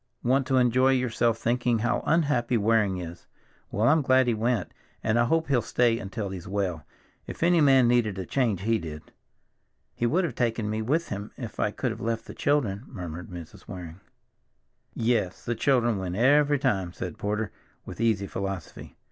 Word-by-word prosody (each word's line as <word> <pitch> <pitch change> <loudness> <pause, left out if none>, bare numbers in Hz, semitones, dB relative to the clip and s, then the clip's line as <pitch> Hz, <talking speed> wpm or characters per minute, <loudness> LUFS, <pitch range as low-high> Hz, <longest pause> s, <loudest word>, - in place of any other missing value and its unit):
"Want 130 +2 +2
to 130 -1 +2
enjoy 130 +2 +4
yourself 120 -2 +1
thinking 120 0 +1
how 120 +3 0
unhappy 140 -7 +2
Waring 105 -3 +2
is. 85 -1 -8 0.4
Well, 110 +3 +1
I'm 155 +3 +5
glad 130 -1 +4
he 120 - +2
went, 115 +1 -1 0.3
and 110 +2 +2
I 120 - +4
hope 165 +5 +1
he'll 135 -4 +2
stay 115 -1 +1
until 100 0 -4
he's 90 -3 -7
well; 95 -5 -2 0.4
if - - -5
any 170 -1 +4
man 135 -4 +5
needed 120 -5 +2
a 95 - -4
change, 115 -5 0
he 115 +2 +1
did." 75 -3 -8 0.8
"He 120 - 0
would 175 +10 +2
have 170 - -2
taken 115 -3 -1
me 110 +1 -2
with 150 +10 0
him 100 +1 -5
if - - -7
I - - +2
could - - -2
have - - -7
left 115 0 -2
the - - -9
children," 120 -8 0
murmured 90 - -7
Mrs. 85 -3 -10
Waring. 90 -1 -8 1.0
"Yes, 115 -6 0
the 120 - 0
children 120 -3 +2
win 90 -1 -4
every 145 +5 +4
time," 95 -9 0
said 90 -3 -6
Porter 105 0 -2 0.3
with - - -7
easy 110 -4 +2
philosophy. 95 -3 -6
115 Hz, 180 wpm, -27 LUFS, 95-130 Hz, 1.0 s, I'm